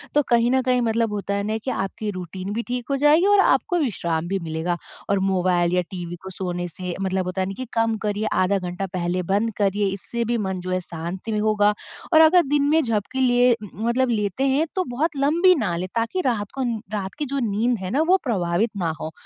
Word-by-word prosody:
तो 295 Hz, -, +6 dB
कहीं 235 Hz, 0 st, +4 dB
न 260 Hz, 0 st, +3 dB
कहीं 250 Hz, -1 st, +2 dB
मतलब 225 Hz, -1 st, +1 dB
होता 200 Hz, -1 st, -3 dB
है 200 Hz, -, -1 dB
ना 220 Hz, +1 st, -1 dB
कि 260 Hz, -, 0 dB
आपकी 195 Hz, +2 st, -3 dB
रूटीन 185 Hz, +2 st, -6 dB
भी 230 Hz, -, -1 dB
ठीक 245 Hz, -1 st, -3 dB
हो -, -, +2 dB
जाएगी 295 Hz, +5 st, +5 dB
और 410 Hz, 0 st, +5 dB
आपको 355 Hz, -2 st, +3 dB
विश्राम 170 Hz, -, -1 dB
भी 195 Hz, +2 st, -1 dB
मिलेगा 160 Hz, +2 st, -2 dB, 0.3 s
और 200 Hz, -1 st, +2 dB
मोबाइल 180 Hz, -2 st, +1 dB
या 180 Hz, -, +3 dB
टीवी 175 Hz, -2 st, -5 dB
को 190 Hz, -, -7 dB
सोने 175 Hz, -1 st, -3 dB
से 180 Hz, +1 st, -6 dB
मतलब 190 Hz, -1 st, -1 dB
होता 185 Hz, +1 st, -2 dB
है 185 Hz, -, 0 dB
ना 195 Hz, -, -4 dB
कि 255 Hz, -, -4 dB
कम 225 Hz, -1 st, +1 dB
करिए 210 Hz, 0 st, -1 dB
आधा 190 Hz, +2 st, +2 dB
घंटा 180 Hz, +2 st, -4 dB
पहले 180 Hz, 0 st, -1 dB
बंद 225 Hz, +2 st, +1 dB
करिए 200 Hz, 0 st, +1 dB
इससे 235 Hz, +4 st, -3 dB
भी 235 Hz, +1 st, 0 dB
मन 190 Hz, -3 st, -2 dB
जो 185 Hz, -, -3 dB
है 185 Hz, -, +1 dB
शांत 175 Hz, +5 st, -6 dB
भी 215 Hz, -, 0 dB
होगा 210 Hz, -1 st, +3 dB, 0.4 s
और 315 Hz, -, +8 dB
अगर 345 Hz, +3 st, +7 dB
दिन 290 Hz, 0 st, +2 dB
में 320 Hz, +1 st, +4 dB
झपकी 230 Hz, +3 st, -1 dB
लिए 245 Hz, 0 st, +4 dB
उ 215 Hz, -2 st, -6 dB
उ 215 Hz, +5 st, -6 dB
मतलब 255 Hz, +1 st, +2 dB
लेते 210 Hz, +3 st, 0 dB
हैं 280 Hz, +4 st, +2 dB
तो 370 Hz, -, +1 dB
बहुत 320 Hz, +4 st, 0 dB
लंबी 335 Hz, +7 st, +4 dB
ना 205 Hz, -, -1 dB
लें 185 Hz, +2 st, -3 dB
ताकि 230 Hz, +11 st, 0 dB
रात 215 Hz, -5 st, -1 dB
को 270 Hz, -, -1 dB
नी 235 Hz, -3 st, -1 dB
रात 195 Hz, -2 st, -3 dB
की 295 Hz, -, 0 dB
जो 280 Hz, 0 st, -2 dB
नींद 230 Hz, +4 st, +1 dB
है 185 Hz, -, -4 dB
ना 280 Hz, -, +2 dB
वो 375 Hz, +1 st, +6 dB
प्रभावित 200 Hz, -2 st, 0 dB
ना 175 Hz, -4 st, 0 dB
हो। 160 Hz, -, -5 dB
210 Hz, 240 wpm, -23 LUFS, 185-250 Hz, 0.4 s, और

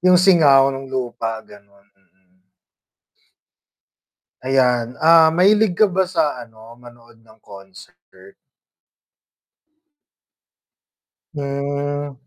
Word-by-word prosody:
'Yung 180 Hz, 0 st, +3 dB
singaw 150 Hz, -8 st, +4 dB
ng 135 Hz, 0 st, -8 dB
lupa, 120 Hz, -4 st, -5 dB
gano'n, 100 Hz, -1 st, -21 dB
mm. 95 Hz, -1 st, -41 dB, 1.9 s
Ayan, 125 Hz, -2 st, -1 dB
ah, 160 Hz, 0 st, +4 dB
mahilig 190 Hz, +3 st, +1 dB
ka 215 Hz, -, +4 dB
ba 190 Hz, -1 st, -2 dB
sa 155 Hz, -8 st, -2 dB
ano, 115 Hz, -1 st, -16 dB
manood 120 Hz, -2 st, -19 dB
ng 110 Hz, 0 st, -23 dB
concert? 175 Hz, -, -17 dB, 3.0 s
Hmm. 145 Hz, 0 st, -5 dB
135 Hz, 85 wpm, -18 LUFS, 115-165 Hz, 3.0 s, singaw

